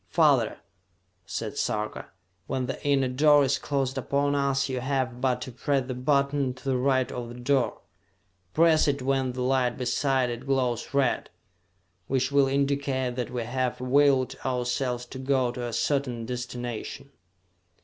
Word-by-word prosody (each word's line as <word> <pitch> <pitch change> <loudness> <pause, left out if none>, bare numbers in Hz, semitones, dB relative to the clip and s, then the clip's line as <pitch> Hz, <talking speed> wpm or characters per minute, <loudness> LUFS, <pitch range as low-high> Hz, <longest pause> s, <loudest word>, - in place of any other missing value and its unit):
"Father," - - +3 0.7
said - - -4
Sarka, 105 0 -2 0.4
"when 130 -1 -1
the 135 - -5
inner 140 -2 +2
door 145 +3 +5
is 135 0 +1
closed 135 -2 -1
upon 140 +2 0
us, 140 -1 +1
you 130 -2 -2
have 130 -1 -2
but 125 -1 +1
to 130 - -6
press 135 +2 0
the 130 - -4
button 140 0 +1
to 130 - -16
the 135 -1 +1
right 130 0 +1
of 120 -1 -5
the 120 +1 -9
door. 130 0 0 0.7
Press 160 -1 +5
it 140 -2 0
when 135 -1 0
the 125 0 -3
light 125 -2 +1
beside 130 0 +1
it 120 +3 -7
glows 130 -2 0
red, 135 -3 +1 0.8
which 130 0 0
will 140 -1 +4
indicate 140 -1 0
that 125 -2 -3
we 125 -2 -3
have 125 +2 -2
willed 130 0 +3
ourselves 125 -1 -1
to 130 - -9
go 130 -2 +1
to 120 0 -4
a - - -4
certain 125 -3 -1
destination!" 125 +2 -5
130 Hz, 160 wpm, -27 LUFS, 125-140 Hz, 0.8 s, door